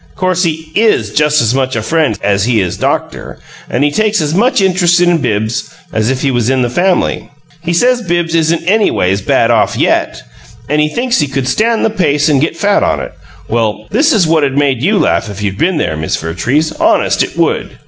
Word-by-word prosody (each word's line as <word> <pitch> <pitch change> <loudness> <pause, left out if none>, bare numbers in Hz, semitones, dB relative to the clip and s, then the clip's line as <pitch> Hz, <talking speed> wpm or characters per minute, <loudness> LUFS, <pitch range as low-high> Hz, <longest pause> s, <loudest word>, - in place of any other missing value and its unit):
'Course 185 -1 0
he 160 -1 -4
IS 205 - +1
just 150 +1 +2
as 115 +1 +1
much 130 -1 -1
a 115 - -2
friend 160 +3 0
as 100 0 +1
he 120 -2 +1
is 90 -3 -2
doctor - - -3 0.3
and 130 - 0
he 145 - +2
takes 215 +4 +1
as 150 -1 -1
much 230 +8 +2
interest 180 -2 +2
in 175 -1 +2
Bibbs 110 -4 -2 0.2
as 110 +1 0
if 130 -1 -2
he 140 - +1
was 120 -2 0
in 130 -1 +1
the 120 - -2
family. 180 +6 0 0.3
He 170 +1 -3
says 245 +8 +2
Bibbs 175 -4 -1
isn't 165 0 +1
anyways 170 - +1
bad - - +1
off - - +1
YET; - - 0 0.4
and 150 +2 +1
he 150 - +1
thinks 245 +6 -1
he 150 - +1
could 135 -1 -3
stand 225 - +1
the 225 - 0
pace 150 -7 +1
and 140 -3 +2
get 160 +2 -1
fat 200 +2 +1
on - - 0
it - - -7 0.3
if - - -25
well, 110 -2 -1
this 290 +9 +2
is 210 - +3
what'd 150 -4 +1
made 135 -4 +1
YOU 200 +8 +1
laugh 110 - 0
if 100 0 -7
you'd 100 -1 -3
been 170 +2 +1
there, 115 - -1
Miss 80 0 -2
Vertrees 125 - -1
honest - - +2
it - - -3
would!" - - -1
150 Hz, 220 wpm, -13 LUFS, 125-180 Hz, 0.4 s, is